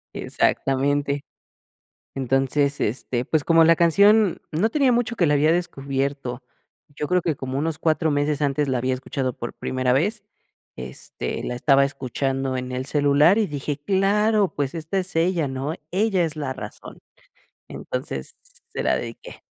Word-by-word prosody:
Exactamente. 140 +1 0 0.9
Entonces, 135 +2 0
este, 120 +2 -1
pues 155 +2 0
como 165 -1 +5
la 165 0 +5
canción 200 +4 +4
no 170 +8 +1
tenía 275 -2 +3
mucho 240 0 +1
que 175 -6 +3
la 145 - +3
había 155 +3 +4
descubierto, 140 -6 -2 0.5
yo 145 0 -5
creo 180 -1 +2
que 160 -4 -1
como 130 0 -4
unos 160 +1 -2
4 160 0 +1
meses 145 +1 0
antes 145 0 +1
la 130 -2 +1
había 130 +1 0
escuchado 130 0 -3
por 120 - -5
primera 130 -1 -1
vez. 205 - +1 0.6
Este, 65 - -5
la - - -3
estaba 135 +2 +4
escuchando 135 -1 -2
en 125 0 -5
el 130 +1 -3
celular 145 +6 +4
y 220 - +2
dije: 145 -2 -4
"Claro, 200 +4 +2
pues 140 -2 -2
esta 165 +4 -3
es 185 0 -1
ella, 165 -3 +1
¿no? 135 +3 -3 0.2
Ella 195 0 +1
es 160 -1 -2
la 145 -3 -3
razón". - - -9 0.7
Entonces, - - -5 0.4
se - - -3
la - - +2
dediqué. - - -8
145 Hz, 155 wpm, -23 LUFS, 135-175 Hz, 0.9 s, como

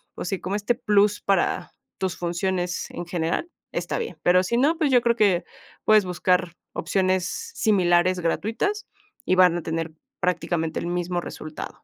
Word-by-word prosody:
pues - - -5
sí, 195 - -2
como 190 +3 -3
este 210 +3 0
plus 205 -3 +3
para 195 -3 0 0.3
tus 185 -2 -2
funciones 180 +1 -2
en 175 - -6
general, 170 - -1 0.2
está - - -2
bien, 460 -2 -4
pero 180 +1 +5
si 210 +6 -1
no, 300 +6 +3
pues, 310 -4 +1
yo 250 -2 +5
creo 235 0 +2
que 190 -6 +3 0.4
puedes 215 -2 +5
buscar 180 0 +1 0.2
opciones 185 +1 +1 0.3
similares 185 -3 +3
gratuitas 225 - -1 0.4
y - - +2
van 180 -2 +5
a 170 - -5
tener 165 0 -3 0.3
prácticamente 170 -2 -1
el - - -4
mismo 175 0 -1
resultado. 155 -2 -8
185 Hz, 160 wpm, -24 LUFS, 175-210 Hz, 0.4 s, pero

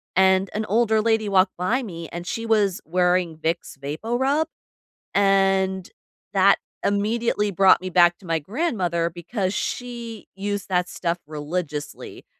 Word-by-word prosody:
and 190 +1 +4
an 215 +1 -2
older 220 +1 +2
lady 220 -1 +1
walked 190 -2 +3
by 220 +9 0
me 170 -8 -7
and 175 0 -6
she 230 0 -3
was 205 -4 +2
wearing 180 -1 +1
Vicks 165 -2 -3
VapoRub 240 - -1 0.7
and 195 -1 +2 0.5
that 195 +1 +5 0.3
immediately 210 +1 +1
brought 195 0 +5
me 185 0 -5
back 175 -1 +5
to 190 - -15
my 165 -1 +1
grandmother 180 - -1
because 185 +3 -3
she 235 0 -5
used 205 +1 -3
that 180 -1 +1
stuff 175 -1 -2
religiously 150 0 -5
190 Hz, 135 wpm, -23 LUFS, 175-215 Hz, 0.7 s, that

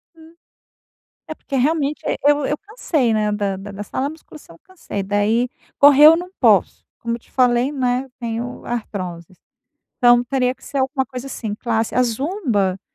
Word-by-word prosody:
Hum. 325 0 -17 0.9
É 315 - -6
porque 275 - -7
realmente 295 +2 0 0.2
eu 290 -1 +3
eu 295 - -1
cansei, 315 - -1
né, 210 -1 +1
da 205 -2 -1
da 195 +2 -9
da 205 +1 -6
sala 265 +6 -3
a - - -4
musculação 310 - -14
eu - - -23
cansei, 330 - -6
daí 205 +5 +1 0.3
correr 285 +1 +7
eu 325 - +7
não 360 +1 -7
posso, - - +3
como 235 0 -4
eu - - -9
te - - -27
falei, 250 +1 +2
né, 255 -1 -1
tenho 235 +1 -5
artrose, 185 -7 -6 0.6
então 240 -1 +5
teria 250 0 0
que - - -25
ser 280 - -5
alguma 265 +1 0
coisa 255 +1 -8
assim, 225 -6 -5
classe. 225 -1 -2
A 250 - +4
Zumba, 235 - -1
250 Hz, 175 wpm, -20 LUFS, 215-285 Hz, 0.9 s, correr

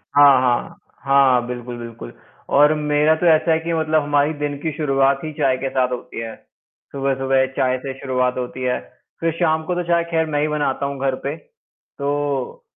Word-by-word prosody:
हाँ, 140 -2 +7
हाँ। 120 -1 0 0.3
हाँ, 135 -3 +4
बिल्कुल, 120 0 -6
बिल्कुल 115 - -9 0.4
और 150 +2 +6
मेरा 150 +1 +2
तो - - +1
ऐसा 160 +1 0
है 160 - +3
कि 165 +1 -3
मतलब 155 -1 +1
हमारी 145 +1 +1
दिन 145 -1 -1
की 160 - -2
शुरुआत 135 -2 +2
ही 155 - -4
चाय 135 -3 +1
के 135 +1 -3
साथ 130 -1 0
होती 125 -2 -6
है। 115 -1 -6 0.6
सुबह-सुबह 135 -1 +1
चाय 130 0 +1
से 135 - -4
शुरुआत 125 -2 0
होती 125 +1 -5
है। 125 0 0 0.4
फिर 165 0 0
शाम 160 -2 +2
को 180 - -2
तो 180 - -1
चाय 170 -1 +2
खैर 160 -1 +2
मैं 145 -1 +1
ही 150 - +1
बनाता 145 -2 -1
हूँ, 140 -1 -4
घर 135 -1 +1
पे। 140 +2 -2
तो, 145 -3 -5
140 Hz, 195 wpm, -20 LUFS, 130-150 Hz, 0.6 s, हाँ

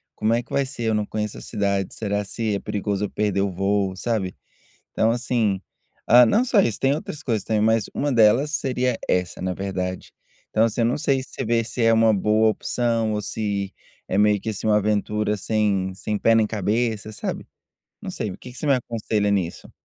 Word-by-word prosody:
como 110 +1 +1
é 120 - +2
que - - -25
vai 140 - +1
ser? 130 -3 -6
Eu - - +1
não 105 -1 0
conheço 105 0 -4
a - - -9
cidade, 100 -3 -1
será 105 -1 -2
se 110 0 -2
é - - -2
perigoso 100 0 -2
eu - - -5
perder 105 -2 0
o 100 0 0
voo", 95 +1 0
sabe, 100 -3 -2 0.6
então 110 - +2
assim 115 -5 0 0.5
ah, 120 +1 +9
não 220 - +3
só 240 -4 +3
isso, 115 - -1
tem 135 +1 +3
outras 150 -1 -6
coisas 115 -5 -1
também, 110 -1 0
mas 110 0 +3
uma 145 0 -1
delas 120 +4 +4
seria 125 -4 0
essa, 90 -1 -1
na 90 0 -1
verdade. 95 -1 -4 0.4
Então, 110 - +2
assim, 115 +1 -1
eu - - +3
não 120 - +1
sei 135 -2 +1
se 130 - -11
você - - -3
vê 115 +1 +2
se 120 +1 -3
é 115 0 +5
uma 115 0 +5
boa 105 +2 +3
opção 115 0 0
ou 105 - -1
se 100 -2 -3 0.4
é 95 - -1
meio 105 -1 +3
que 110 - -3
assim 105 -1 -5
uma 105 -1 +4
aventura 105 0 0
sem 100 -3 0
sem 105 +3 -3
pé 115 - +3
nem 110 -1 +3
cabeça, 110 +1 -1
sabe, 105 - -5 0.6
não - - -5
sei. 105 - -4
O - - -9
que 125 - -10
que 125 - -12
você - - -4
me 140 - +5
aconselha 110 -4 -1
nisso? 95 -4 -2
110 Hz, 220 wpm, -23 LUFS, 100-115 Hz, 0.6 s, ah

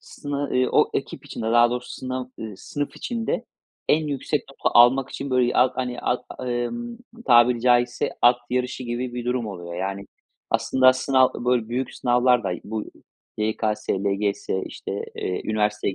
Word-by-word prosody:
sını, 145 - -6 0.2
ııı, 125 0 +2
o - - +4
ekip - - -4
içinde 110 - -5
daha 120 0 +6
doğrusu, 125 0 -4
sınav 130 0 -4 0.2
ııı, 110 -3 -6
sınıf 145 +6 -5
içinde 230 -1 -2 0.4
en 155 0 +3
yüksek 145 0 -1
notu 135 - +1
almak 130 +2 +6
için 140 -1 -5
böyle 125 -1 +2
at 130 0 +3
hani, 125 -1 -3
at 125 - -1 0.2
emm, 235 - -3 0.3
tabiri 120 0 +5
caizse 120 0 +2
at 120 0 +7
yarışı 125 +1 -1
gibi 120 +1 -3
bir 120 -1 -4
durum 125 -2 -1
oluyor. 85 -4 -7
Yani, 95 +2 -4 0.4
aslında 130 0 +4
sınav, 130 0 +3
böyle 120 -2 0
büyük 125 +2 -3
sınavlar 125 -1 +3
da 95 - 0
bu, 110 0 -4 0.5
YKS, 110 0 -1
LGS, 100 0 -1 0.2
işte, - - -7 0.2
eee, 90 - -3
üniversiteye 105 -2 0
125 Hz, 160 wpm, -24 LUFS, 110-130 Hz, 0.5 s, at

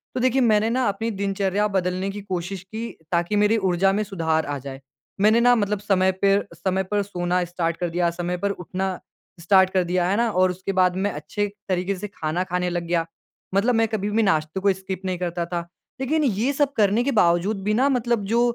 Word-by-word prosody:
तो - - 0
देखिए, 260 +1 +3
मैंने 210 +1 +2
ना 255 +2 +1
अपनी 225 +3 -2
दिनचर्या 200 +1 0
बदलने 185 +1 0
की 205 - -5
कोशिश 185 -1 -4
की 220 +4 -6 0.2
ताकि 175 +3 +1
मेरे 215 +2 +3
ऊर्जा 185 +2 +3
में - - +1
सुधार 160 -3 0
आ 145 0 -3
जाए। 135 -1 -7 0.4
मैंने 215 +3 +5
ना 245 0 +6
मतलब 210 -2 0
समय 190 -2 +2
पेर 200 +1 +3
समय 190 0 -1
पर 205 0 +2
सोना 180 -1 -1
स्टार्ट 170 -1 -2
कर 175 - -2
दिया, 175 -1 +2
समय 175 +1 -1
पर 200 - +2
उठना 190 +2 -2 0.5
स्टार्ट 190 +2 +4
कर 185 -1 +1
दिया, 180 0 +1
है 195 - +2
ना? 235 0 +2
और 185 -1 +3
उसके 185 +2 -4
बाद 180 -1 +3
मैं 205 - +1
अच्छे 180 +7 -2 0.2
तरीके 185 +1 0
से 210 +3 -5
खाना 170 -2 -2
खाने 180 0 0
लग 175 -1 -2
गया। 170 -1 +1 0.5
मतलब 230 +5 +3
मैं 225 0 +3
कभी 210 -2 -2
भी 225 +2 +2
नाश्ते 155 -3 0
को 195 0 +3
स्किप 190 0 -6
नहीं 185 -1 -1
करता 175 -1 -2
था, 175 0 -3 0.4
लेकिन 305 +4 +1
ये 240 0 +1
सब 285 0 +1
करने 210 +2 +3
के 280 - 0
बावजूद 175 +4 +2
भी 210 +2 +1
ना 270 - +4
मतलब 235 -3 0
जो 235 - +4
190 Hz, 215 wpm, -23 LUFS, 180-210 Hz, 0.5 s, ना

